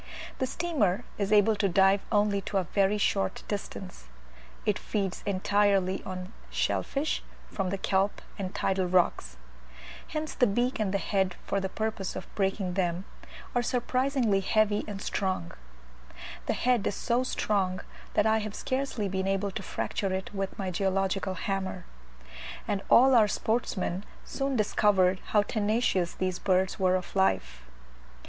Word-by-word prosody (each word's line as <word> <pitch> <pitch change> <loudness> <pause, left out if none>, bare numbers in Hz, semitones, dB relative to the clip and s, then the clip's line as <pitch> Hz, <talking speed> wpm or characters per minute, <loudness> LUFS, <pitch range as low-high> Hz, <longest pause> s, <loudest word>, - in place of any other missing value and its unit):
The 260 - +1
steamer 245 - 0 0.2
is 200 0 0
able 215 +1 +5
to 200 -1 +2
dive 195 +2 +4
only 205 -1 +2
to 200 - 0
a 190 - +2
very 195 +3 +2
short 200 -1 0
distance. 195 - -6 0.6
It 210 -2 +1
feeds 195 -4 -2
entirely 195 -1 +2
on 185 +2 -6 0.2
shell - - 0
fish 285 +3 -2 0.3
from 195 -2 -1
the 195 - -1
kelp 195 +1 +1 0.2
and 185 -2 -3
tidal 190 -1 +1
rocks: 175 - +1 0.7
hence 310 0 -3
the 245 - +3
beak 240 +5 0
and 210 -3 0
head, 195 -2 0
for 200 - 0
the 190 0 -2
purpose 215 -2 -3
of - - -5
breaking 195 -2 0
them, 180 0 -1 0.5
are 245 - +2
surprisingly 250 -3 +1
heavy 210 +1 +2
and 205 -1 -5
strong: 185 - -1 1.0
the - - +2
head 245 -4 +2
is - - -1
so 240 0 +1
strong 195 -7 0 0.4
that - - +4
I 220 0 +4
have 215 -1 -5
scarcely 260 -5 -2
been 190 0 -2
able 195 +1 0
to 195 - -5
fracture 195 0 -2
it 190 +2 -3
with 195 -1 -3
my 190 -2 -2
geological 190 0 0
hammer; 190 -2 -3 0.8
and 200 -2 0
all 265 +2 +7
our 225 -4 +6
sportsmen 200 -4 -1 0.2
soon 275 -1 -2
discovered 195 -4 +3
how 210 -1 +3
tenacious 205 -4 +1
these 185 -1 -2
birds 185 0 +1
were 185 -1 +3
of 185 +1 -4
life. 65 - +1
195 Hz, 150 wpm, -29 LUFS, 190-215 Hz, 1.0 s, all